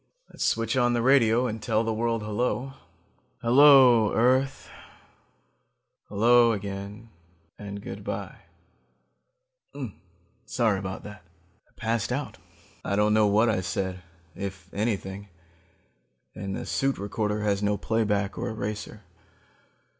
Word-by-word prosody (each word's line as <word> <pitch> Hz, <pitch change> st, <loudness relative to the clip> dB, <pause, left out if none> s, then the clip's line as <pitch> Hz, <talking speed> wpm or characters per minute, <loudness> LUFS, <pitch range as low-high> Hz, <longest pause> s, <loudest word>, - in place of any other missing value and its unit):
Let's -, -, -5 dB
switch 115 Hz, +1 st, 0 dB
on 120 Hz, -1 st, +2 dB
the 120 Hz, -, +1 dB
radio 125 Hz, -2 st, +4 dB
and 110 Hz, -2 st, -4 dB
tell 110 Hz, 0 st, +1 dB
the 115 Hz, 0 st, -1 dB
world 115 Hz, 0 st, -1 dB
hello. 120 Hz, +4 st, -2 dB, 0.7 s
Hello, 125 Hz, -3 st, +7 dB
earth... 130 Hz, +3 st, +1 dB, 1.4 s
hello, 115 Hz, +3 st, +4 dB
again... 100 Hz, +2 st, -7 dB, 0.5 s
and 100 Hz, 0 st, -7 dB
good -, -, -7 dB
by... -, -, -5 dB, 2.1 s
"Sorry 110 Hz, -5 st, +1 dB
about 95 Hz, -1 st, -6 dB
that. 105 Hz, -2 st, -10 dB, 0.5 s
I -, -, -32 dB
passed 115 Hz, 0 st, -2 dB
out. 140 Hz, +3 st, -4 dB, 0.4 s
I 100 Hz, -, -1 dB
don't 105 Hz, +1 st, +3 dB
know 110 Hz, -1 st, +4 dB
what 105 Hz, +3 st, +3 dB
I 105 Hz, -5 st, +1 dB
said, 95 Hz, 0 st, -3 dB, 0.3 s
if 95 Hz, -2 st, -7 dB
anything, 100 Hz, -2 st, -3 dB, 1.1 s
and 95 Hz, 0 st, -5 dB
the -, -, -5 dB
suit 135 Hz, 0 st, 0 dB
recorder 105 Hz, +1 st, -2 dB
has 100 Hz, -1 st, 0 dB
no 105 Hz, 0 st, +1 dB
playback 105 Hz, -2 st, -1 dB
or 120 Hz, +1 st, -2 dB
eraser. 105 Hz, -1 st, -5 dB
110 Hz, 120 wpm, -26 LUFS, 100-120 Hz, 2.1 s, Hello